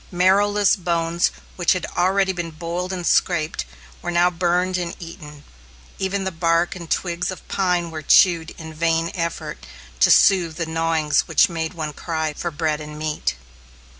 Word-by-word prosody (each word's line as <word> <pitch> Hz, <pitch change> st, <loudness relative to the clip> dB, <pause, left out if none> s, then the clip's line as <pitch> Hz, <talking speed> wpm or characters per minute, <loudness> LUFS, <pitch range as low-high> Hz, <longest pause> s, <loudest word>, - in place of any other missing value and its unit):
Marrowless 200 Hz, +3 st, +3 dB
bones 170 Hz, -1 st, 0 dB, 0.3 s
which 175 Hz, -, +3 dB
had 185 Hz, -, -3 dB
already 190 Hz, +2 st, +2 dB
been 175 Hz, -2 st, -4 dB
boiled 170 Hz, +3 st, -4 dB
and 180 Hz, -2 st, -4 dB
scraped, 165 Hz, -3 st, +1 dB, 0.4 s
were 175 Hz, -, -4 dB
now 175 Hz, +1 st, +3 dB
burned 180 Hz, +1 st, 0 dB
and 175 Hz, -2 st, -3 dB
eaten, 150 Hz, -4 st, -10 dB, 0.6 s
even 195 Hz, +1 st, -1 dB
the 190 Hz, -, -2 dB
bark 170 Hz, +1 st, +1 dB
and 170 Hz, -3 st, -9 dB
twigs 175 Hz, -1 st, -1 dB
of 185 Hz, -, -8 dB
pine 180 Hz, -3 st, 0 dB
were 155 Hz, -1 st, -5 dB
chewed 170 Hz, +1 st, +4 dB
in 160 Hz, -1 st, -8 dB
the 160 Hz, -, -11 dB
vain 165 Hz, +1 st, 0 dB
effort 170 Hz, -3 st, -4 dB, 0.4 s
to -, -, +5 dB
soothe 175 Hz, -5 st, +5 dB
the 165 Hz, 0 st, -2 dB
gnawings 160 Hz, -2 st, +1 dB
which 160 Hz, -, +4 dB
made 165 Hz, 0 st, -4 dB
one 155 Hz, -2 st, -4 dB
cry 160 Hz, -1 st, -3 dB
for 170 Hz, -, -4 dB
bread 155 Hz, -1 st, -2 dB
and 150 Hz, 0 st, -8 dB
meat. 150 Hz, -, -2 dB
170 Hz, 165 wpm, -22 LUFS, 160-180 Hz, 0.6 s, to